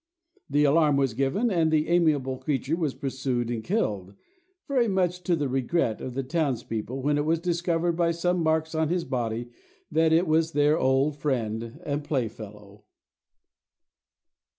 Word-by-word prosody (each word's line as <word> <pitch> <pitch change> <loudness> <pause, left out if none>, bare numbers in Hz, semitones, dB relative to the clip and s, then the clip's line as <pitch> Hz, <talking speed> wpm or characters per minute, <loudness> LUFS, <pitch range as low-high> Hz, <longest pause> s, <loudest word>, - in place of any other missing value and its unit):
The 145 +1 +3
alarm 150 0 +4
was 135 -4 +1
given, 140 - 0
and 165 -4 +2
the 155 -1 +2
amiable 150 -7 +2
creature 150 +1 -1
was 160 -6 -2
pursued 130 -3 -2
and 115 -2 -3
killed,—very 240 - -3
much 180 -3 0
to 175 0 +1
the 145 -3 -1
regret 130 -1 0
of 125 - -6
the 135 - -1
townspeople, 130 -4 -2
when 145 +1 +2
it - - +1
was 165 +2 +2
discovered 170 0 0
by 170 0 +1
some 175 +1 0
marks 160 0 0
on 160 -1 0
his 175 0 0
body 120 -2 -3 0.4
that 160 +1 +3
it 165 +3 +4
was 160 0 +1
their 145 +2 +3
old 135 +3 +2
friend 115 -5 -2
and 145 0 -2
playfellow. 105 -7 -5
150 Hz, 150 wpm, -26 LUFS, 130-170 Hz, 0.4 s, alarm